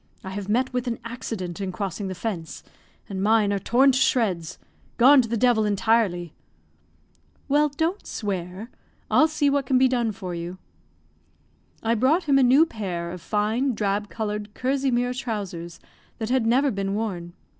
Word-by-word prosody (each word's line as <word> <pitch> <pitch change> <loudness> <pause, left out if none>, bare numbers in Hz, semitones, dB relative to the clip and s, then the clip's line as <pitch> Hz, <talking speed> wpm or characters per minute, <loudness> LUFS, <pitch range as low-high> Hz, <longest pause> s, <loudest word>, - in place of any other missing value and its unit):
I 190 - -6
have 200 0 -5
met 250 +4 +1
with 250 0 -2
an 230 -1 -1
accident 210 -6 -5
in 190 -1 -2
crossing 195 +1 -4
the 185 - -5
fence, 175 -7 -5 0.4
and 190 -2 -4
mine 210 0 +3
are 200 - 0
torn 260 +7 +4
to 260 - +1
shreds 180 -11 +1 0.4
gone 265 +3 +7
to 230 - -5
the 230 - 0
devil 240 -1 +3
entirely." 205 -5 +1 1.1
"Well, 295 +1 +3
don't 325 +7 -2
swear. 195 +1 -4 0.4
I'll 310 - +5
see 305 -2 0
what 280 -2 +1
can 260 - +3
be 260 +1 +5
done 240 -3 0
for 185 -3 -6
you." 170 +2 -5 1.3
I 225 0 +2
brought 270 - +2
him 280 -3 +3
a - - +5
new 265 +5 +6
pair 180 - -4
of 180 -1 -8
fine, 220 - 0
drab 205 0 -1
colored 210 -1 -4
kersey 270 +1 0
mere 245 0 0
trousers 200 -9 -5 0.4
that 225 0 -3
had 255 -3 +2
never 265 +4 +3
been 195 0 -2
worn. 180 -6 -4
220 Hz, 170 wpm, -24 LUFS, 195-255 Hz, 1.3 s, gone